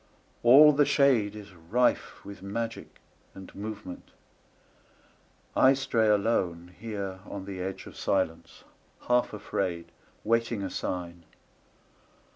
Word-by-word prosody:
All 145 Hz, +6 st, +8 dB
the 145 Hz, +1 st, +4 dB
shadeIs 105 Hz, -9 st, +1 dB, 0.2 s
rife 125 Hz, +2 st, +1 dB
with 100 Hz, 0 st, -10 dB
magic 115 Hz, +4 st, -5 dB, 0.4 s
and 95 Hz, -1 st, -11 dB
movement. 105 Hz, -3 st, -8 dB, 1.5 s
I 130 Hz, -, +6 dB
stray 130 Hz, -5 st, +1 dB
aloneHere 100 Hz, -1 st, -1 dB
on 100 Hz, -1 st, -6 dB
the 95 Hz, -2 st, -6 dB
edge 95 Hz, +1 st, -5 dB
of -, -, -12 dB
silence, 85 Hz, -4 st, -2 dB, 0.4 s
half 125 Hz, 0 st, +2 dB
afraid, 90 Hz, -5 st, -3 dB, 0.3 s
Waiting 115 Hz, -1 st, 0 dB
a 95 Hz, -, -4 dB
sign. 85 Hz, -2 st, -5 dB
100 Hz, 100 wpm, -28 LUFS, 95-115 Hz, 1.5 s, All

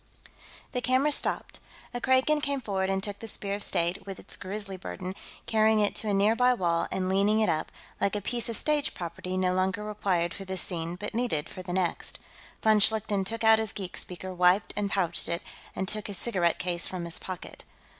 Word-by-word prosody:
The 250 Hz, -, -1 dB
camera 255 Hz, +5 st, +3 dB
stopped. -, -, -1 dB, 0.3 s
A 245 Hz, -, -3 dB
Kragan 260 Hz, +4 st, +3 dB
came 280 Hz, -2 st, 0 dB
forward 195 Hz, -5 st, -1 dB
and 190 Hz, 0 st, 0 dB
took 205 Hz, -1 st, -4 dB
the 225 Hz, -, -7 dB
Spear 200 Hz, -2 st, -1 dB
of 205 Hz, -, -3 dB
State, 175 Hz, 0 st, +1 dB
with 195 Hz, -, -5 dB
its -, -, -9 dB
grisly 195 Hz, 0 st, -5 dB
burden, 185 Hz, 0 st, -5 dB, 0.3 s
carrying 220 Hz, 0 st, +4 dB
it 205 Hz, -1 st, +2 dB
to 215 Hz, -, 0 dB
a -, -, +2 dB
nearby 230 Hz, +5 st, +4 dB
wall 170 Hz, -5 st, +1 dB
and 185 Hz, -1 st, -1 dB
leaning 200 Hz, +3 st, +3 dB
it 220 Hz, -, +3 dB
up, 155 Hz, -, 0 dB, 0.3 s
like 200 Hz, +1 st, +1 dB
a -, -, +1 dB
piece 235 Hz, +3 st, -1 dB
of 230 Hz, -, -1 dB
stage 300 Hz, 0 st, +1 dB
property 180 Hz, +2 st, -4 dB
no 185 Hz, -1 st, +2 dB
longer 190 Hz, +2 st, 0 dB
required 190 Hz, -4 st, 0 dB
for 195 Hz, -, -7 dB
this 190 Hz, -1 st, -1 dB
scene 170 Hz, -1 st, -3 dB
but 205 Hz, +3 st, -5 dB
needed 230 Hz, -11 st, -1 dB
for 185 Hz, -, -6 dB
the 180 Hz, -1 st, -6 dB
next. 180 Hz, -2 st, -1 dB, 0.5 s
Von 215 Hz, -1 st, +6 dB
Schlichten 210 Hz, -1 st, +2 dB
took 225 Hz, +4 st, -3 dB
out 220 Hz, 0 st, +7 dB
his 220 Hz, -2 st, 0 dB
geek 190 Hz, -3 st, -5 dB
speaker, 185 Hz, +1 st, -5 dB
wiped 180 Hz, +2 st, +3 dB
and 205 Hz, -1 st, 0 dB
pouched 180 Hz, -4 st, +1 dB
it, 170 Hz, 0 st, -1 dB, 0.3 s
and 190 Hz, -, -2 dB
took 215 Hz, +1 st, +1 dB
his 200 Hz, -2 st, -3 dB
cigarette 180 Hz, -7 st, +1 dB
case 175 Hz, -1 st, -1 dB
from 180 Hz, -2 st, -4 dB
his 170 Hz, 0 st, -5 dB
pocket. 185 Hz, -2 st, -7 dB
195 Hz, 210 wpm, -28 LUFS, 185-220 Hz, 0.5 s, out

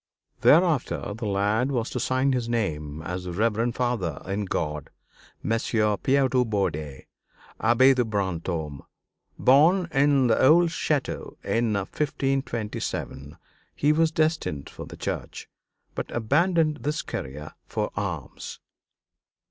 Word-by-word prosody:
Thereafter 155 Hz, -, +3 dB
the 110 Hz, +1 st, -5 dB
lad 105 Hz, +6 st, +1 dB
was 120 Hz, -3 st, -1 dB
to 125 Hz, -, -2 dB
sign 130 Hz, +3 st, +1 dB
his 120 Hz, -2 st, -1 dB
name 80 Hz, -10 st, -2 dB
as 90 Hz, +1 st, -4 dB
the 90 Hz, -, -4 dB
Reverend 115 Hz, +4 st, 0 dB
Father 115 Hz, -, -1 dB
in 100 Hz, +2 st, -2 dB
God, 75 Hz, -5 st, -3 dB, 0.5 s
Messire 110 Hz, -1 st, +1 dB
Pierre 135 Hz, +5 st, +2 dB
de 130 Hz, -1 st, +2 dB
Bourdeille, 80 Hz, -, -2 dB, 0.6 s
Abbé 120 Hz, +4 st, +5 dB
de 125 Hz, -1 st, +2 dB
Brantôme. 85 Hz, -, -3 dB, 0.6 s
Born 165 Hz, +8 st, +5 dB
in 140 Hz, -1 st, +3 dB
the 115 Hz, -2 st, +3 dB
old 165 Hz, +6 st, +6 dB
château 150 Hz, -3 st, -2 dB
in 115 Hz, -1 st, +1 dB
1527, 110 Hz, -, -3 dB, 0.4 s
he 150 Hz, +1 st, +3 dB
was 160 Hz, +1 st, +3 dB
destined 155 Hz, -, -1 dB
for -, -, -9 dB
the -, -, -10 dB
church, -, -, -5 dB, 0.5 s
but -, -, -4 dB
abandoned 155 Hz, +6 st, +2 dB
this 150 Hz, +2 st, -2 dB
career 75 Hz, +3 st, -6 dB, 0.2 s
for -, -, -2 dB
arms. -, -, -5 dB
115 Hz, 125 wpm, -25 LUFS, 95-140 Hz, 0.6 s, old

